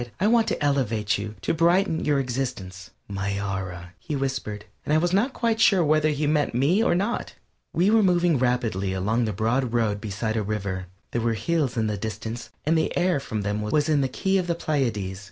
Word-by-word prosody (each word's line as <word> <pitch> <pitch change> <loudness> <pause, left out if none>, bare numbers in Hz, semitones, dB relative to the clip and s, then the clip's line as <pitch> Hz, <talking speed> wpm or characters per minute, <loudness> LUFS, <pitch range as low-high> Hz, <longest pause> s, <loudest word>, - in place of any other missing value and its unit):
"I 190 - +1
want 230 +1 +4
to - - -1
elevate 115 -7 +1
you; 105 +1 -5
to - - +1
brighten 170 +1 +2
your 145 -2 +2
existence." 120 -9 -4 0.2
"My 100 0 -2
Aura!" 95 -3 -5
he 150 - -4
whispered; 130 -6 -3 0.2
and 150 - +1
I - - +5
was 175 +2 +1
not 220 +8 +2
quite 230 -3 0
sure 190 -6 +5
whether 155 +1 +3
he 150 0 -1
meant 145 -4 +1
me 160 - +3
or - - +3
not. 200 +6 -2 0.4
We 185 +5 +2
were 225 0 +5
moving 175 -6 +3
rapidly 115 -7 0
along 110 +6 0
the 110 - -1
broad 115 +4 0
road 110 -4 +1
beside 110 +2 -2
a - - +1
river. 100 -3 -3 0.2
There 120 - -1
were 115 0 +1
hills 145 -1 -1
in 110 - +1
the 105 -1 -1
distance 110 +3 -5 0.2
and 160 +2 +3
the 160 - 0
air 180 -3 +2
from 110 -5 -4
them 105 +1 -1
was 145 +8 +1
in 150 -2 +3
the 135 - +1
key 190 +8 0
of 180 - -2
the 170 - 0
Pleiades. 115 - -1
125 Hz, 210 wpm, -25 LUFS, 105-160 Hz, 0.4 s, I